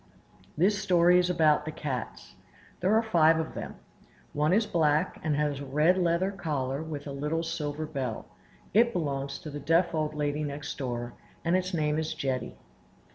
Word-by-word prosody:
This 195 +5 +2
story 180 -2 +5
is 180 0 +1
about 155 -4 +3
the 155 - -5
cats. 135 -6 -5 0.5
There 190 +4 +2
are 225 - +4
five 165 -7 +4
of 160 - -3
them. - - -6 0.6
One 150 +2 +1
is 215 +4 +3
black, 155 -5 +1
and 155 -2 +1
has 145 -1 0
a 140 - -6
red 150 +6 +3
leather 180 +1 +1
collar 145 -7 -2
with 155 -3 -6
a 145 - -5
little 150 +4 -2
silver 155 -2 -3
bell; 135 -7 -4 0.5
it 235 +2 +4
belongs 140 -5 -2
to 155 - -8
the 145 - -5
deaf 165 +5 +2
old 155 -1 -1
lady 150 0 -1
next 145 0 -5
door, 120 -2 -3 0.3
and 170 +2 +3
its 185 0 0
name 155 -3 0
is 160 0 -3
Jetty. 130 -2 -3
155 Hz, 180 wpm, -28 LUFS, 145-175 Hz, 0.6 s, story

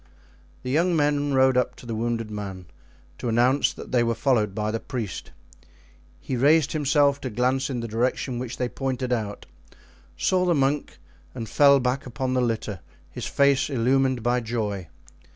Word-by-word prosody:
The 125 - -3
young 170 +5 +2
men 145 -2 +1
rode 130 0 +4
up 125 - +1
to - - -14
the 115 - -4
wounded 115 -1 -2
man 95 -3 -6 0.5
to 120 - -2
announce 125 +4 +3
that - - -10
they 125 - +3
were 115 0 +1
followed 110 -5 +1
by 105 0 -1
the 115 - -2
priest. 115 - -5 0.9
He 130 - -4
raised 145 +4 +4
himself 145 -1 +2
to 130 - -3
glance 130 +4 0
in 125 -3 -3
the 115 - -4
direction 120 +2 -1
which 125 -1 -5
they 125 - -1
pointed 130 -1 -2
out, 105 -4 -3 0.7
saw 185 -1 +2
the 175 -2 +2
monk, 140 +1 0 0.4
and 115 -3 -5
fell 140 +3 +5
back 130 +2 -1
upon 130 +2 -3
the 130 - +2
litter, 110 -5 -2 0.3
his 125 - -5
face 140 0 +2
illumined 130 -1 +1
by 120 +1 +2
joy. 110 -6 -3
125 Hz, 170 wpm, -25 LUFS, 115-140 Hz, 0.9 s, fell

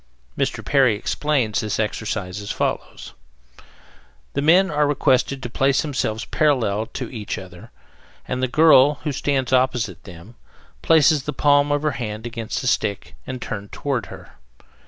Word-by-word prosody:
Mr. - - -2
Perry 130 -6 +3
explains 120 -1 -1
this 110 0 -2
exercise 105 -3 -3
as 100 - -8
follows: - - -3 1.2
The 140 - -1
men 180 +6 +4
are 150 0 +2
requested 135 -1 +1
to - - -3
place 135 +1 +2
themselves 125 -7 -2
parallel 115 -8 +1
to 125 - -4
each 105 -3 -5
other, 90 -2 -11 0.6
and 125 0 -3
the 130 - +1
girl, 150 0 +5
who 150 - -1
stands 135 -1 -1
opposite 125 -7 0
them, 90 +4 -12 0.5
places 155 -3 +4
the 150 - -3
palm 145 0 +3
of 145 0 0
her 150 - +1
hand 110 0 -5
against 115 -1 -4
the 130 - -4
stick 105 -5 -1
and 130 -1 -5
turned 105 -3 -6
toward 135 -4 -3
her. - - -13
130 Hz, 155 wpm, -22 LUFS, 110-145 Hz, 1.2 s, girl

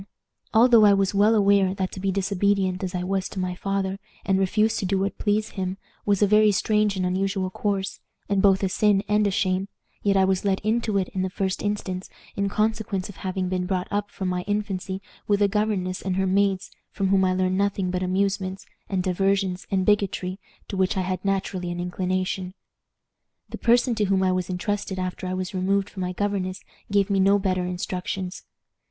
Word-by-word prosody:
Although 230 0 +6
I 205 -1 +7
was 195 0 +1
well 210 +3 +4
aware 200 -2 +3
that 190 -1 -2
to - - -7
be 195 0 0
disobedient 195 -1 0
as 185 0 -3
I 180 - -1
was 190 0 -1
to 190 - -6
my 185 -1 -1
father, 195 +1 -2 0.3
and 195 -1 +2
refuse 215 +3 +2
to - - -2
do 195 +1 +1
what 195 0 -2
please 215 +1 +1
him, 190 -1 -4 0.3
was 205 0 +3
a - - +5
very 210 +1 +5
strange 210 +1 +1
and 185 - 0
unusual 190 +1 -1
course, 195 -1 -2 0.3
and 200 -2 +1
both 195 -1 +4
a 190 - +2
sin 205 0 +2
and 210 0 +3
a - - +2
shame, 185 0 0 0.3
yet 200 -1 +2
I 190 - +5
was 190 -1 +1
led 195 -1 +1
into 220 -1 0
it, 190 -2 0
in 185 - -3
the 185 - -1
first 190 0 -2
instance, 195 -3 -3 0.3
in 200 0 0
consequence 215 -3 -1
of 200 - -11
having 185 -1 -2
been 180 0 -1
brought 185 -1 -1
up 205 0 -1
from 190 - -4
my 180 0 -1
infancy 195 -2 -2 0.2
with 205 -1 +2
a 205 - +4
governess 200 -3 -1
and 190 -1 -2
her 190 0 +1
maids, 195 0 +1 0.2
from 195 -1 -1
whom 195 0 +4
I 185 0 +2
learned 185 0 +1
nothing 200 -2 0
but 180 0 -1
amusements, 190 0 -1 0.2
and 190 -2 0
diversions, 190 0 0
and 190 -1 +1
bigotry, 195 -2 0 0.3
to - - -4
which 190 +1 +1
I - - +2
had 185 0 -3
naturally 195 -2 -1
an 175 0 -4
inclination. 185 +1 -2 0.9
"The - - -7
person 240 +1 +3
to 215 -2 +1
whom 190 -1 +2
I 185 - +3
was 185 0 -1
intrusted 190 +1 -2
after 185 0 -3
I 185 - -2
was 185 +1 -4
removed 195 +2 0
from 190 - -6
my 180 0 -1
governess 190 -1 -2 0.3
gave 200 0 +2
me 195 - +2
no 195 +1 +5
better 185 -2 0
instructions. 180 +1 -4
195 Hz, 205 wpm, -25 LUFS, 185-200 Hz, 0.9 s, I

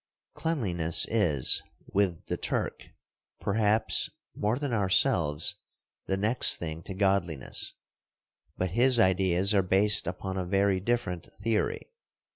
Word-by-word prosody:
Cleanliness 90 - 0
is, 85 - +2 0.3
with 95 -4 0
the - - -3
Turk, - - -3 0.5
perhaps, 105 +1 +1 0.3
more 105 +4 -1
than 140 -3 -2
ourselves, 90 -7 +1 0.5
the 95 - -1
next 110 +5 +4
thing 80 -1 -6
to 95 - -7
godliness. 95 -7 -1 0.8
But 95 -2 -2
his 120 +4 +4
ideas 95 0 +3
are 100 - +4
based 95 +2 +2
upon 95 +2 -4
a 95 - -2
very 100 0 +1
different 95 -5 -3
theory. 115 - -1
95 Hz, 115 wpm, -28 LUFS, 90-105 Hz, 0.8 s, next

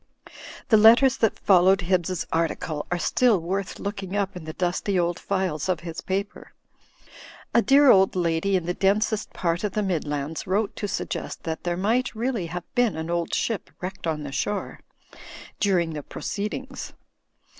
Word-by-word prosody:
The 220 - +6
letters 235 +5 +7
that 225 - +1
followed 190 +1 +4
Hibbs's 180 0 0
article 160 -2 -1
are 175 - 0
still 230 +3 +3
worth 190 +3 -3
looking 200 -1 -5
up 200 -2 -1
in 175 -3 -8
the 155 - -6
dusty 185 +3 -1
old 175 0 0
files 185 -4 -2
of 175 -3 0
his 165 -1 -6
paper. 200 +2 -4 1.0
A 235 - +5
dear 275 +1 +6
old 190 0 +4
lady 175 +2 +1
in 180 -3 0
the 175 - -1
densest 210 +3 +1
part 170 0 -1
of 205 -3 -1
the 210 - 0
Midlands 155 -4 -3
wrote 200 +2 0
to 205 - -2
suggest - - -4
that 160 0 -4
there 175 0 -1
might 225 +7 0
really 230 -5 -2
have 175 +1 -5
been 245 -7 +2
an 160 +1 -4
old 170 -1 -1
ship 225 -4 -2
wrecked 185 -1 -5
on 155 -2 -2
the 140 - -6
shore, 205 +9 -3 0.8
during 175 -5 +1
the 150 - -4
proceed 205 +8 -4
ings. 265 0 -8
185 Hz, 170 wpm, -25 LUFS, 170-210 Hz, 1.0 s, letters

